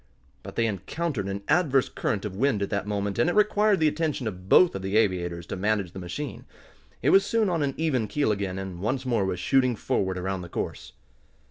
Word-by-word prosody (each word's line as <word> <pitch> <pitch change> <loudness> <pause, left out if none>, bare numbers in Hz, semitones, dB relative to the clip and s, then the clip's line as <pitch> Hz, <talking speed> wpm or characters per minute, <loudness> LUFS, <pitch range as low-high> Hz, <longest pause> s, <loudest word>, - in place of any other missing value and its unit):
But - - -10
they 115 - +2
encountered 115 - -3
an 100 +1 -4
adverse 145 -5 +3
current 105 -1 -2
of 100 -3 -5
wind 115 -2 +1
at - - -4
that 100 0 -1
moment, 100 -1 -2
and 165 - +3
it - - -1
required 210 -1 +3
the 155 - +4
attention 150 -4 -1
of 95 -2 -7
both 180 - +6
of 95 - -4
the 95 +2 0
aviators 90 -5 0
to - - -5
manage 100 -2 0
the 95 - -8
machine. 110 +11 -6 0.6
It 140 - +4
was 195 - +6
soon 220 0 +1
on 170 -3 0
an 140 -2 -1
even 135 -9 0
keel 140 +2 +1
again, 100 -2 -2
and 95 -2 -6
once 130 +7 -2
more 115 -6 +1
was 90 -2 -2
shooting 130 +4 +2
forward 95 -3 -1
around 95 0 -3
the 90 - -9
course. - - -5
110 Hz, 220 wpm, -26 LUFS, 95-150 Hz, 0.6 s, both